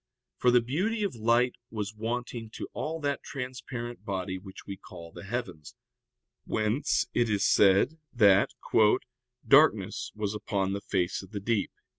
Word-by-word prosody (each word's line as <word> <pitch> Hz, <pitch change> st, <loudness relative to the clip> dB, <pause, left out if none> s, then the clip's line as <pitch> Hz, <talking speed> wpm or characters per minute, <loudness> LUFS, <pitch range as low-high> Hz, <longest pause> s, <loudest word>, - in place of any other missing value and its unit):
For 125 Hz, -, +4 dB
the 125 Hz, 0 st, +5 dB
beauty 190 Hz, -, -1 dB
of 200 Hz, -, -1 dB
light 120 Hz, +2 st, +2 dB
was 105 Hz, -2 st, -4 dB
wanting 115 Hz, +1 st, -4 dB
to -, -, -5 dB
all 160 Hz, +1 st, -3 dB
that 145 Hz, -1 st, -1 dB
transparent 125 Hz, -2 st, -6 dB
body 95 Hz, -1 st, -3 dB
which 95 Hz, 0 st, -12 dB
we 100 Hz, -, -5 dB
call 85 Hz, -3 st, -12 dB
the -, -, -10 dB
heavens, 95 Hz, -9 st, -5 dB, 0.7 s
whence 110 Hz, +6 st, +1 dB
it 120 Hz, -1 st, +2 dB
is 100 Hz, -2 st, +1 dB
said 100 Hz, +11 st, +4 dB
that 100 Hz, -5 st, +5 dB, 1.0 s
"darkness -, -, +4 dB
was 105 Hz, -1 st, -2 dB
upon 100 Hz, -2 st, -1 dB
the 100 Hz, -, -3 dB
fact 90 Hz, -3 st, -1 dB
of 95 Hz, -, -13 dB
the 105 Hz, -, -5 dB
deep." 105 Hz, 0 st, 0 dB
110 Hz, 150 wpm, -29 LUFS, 100-125 Hz, 1.0 s, the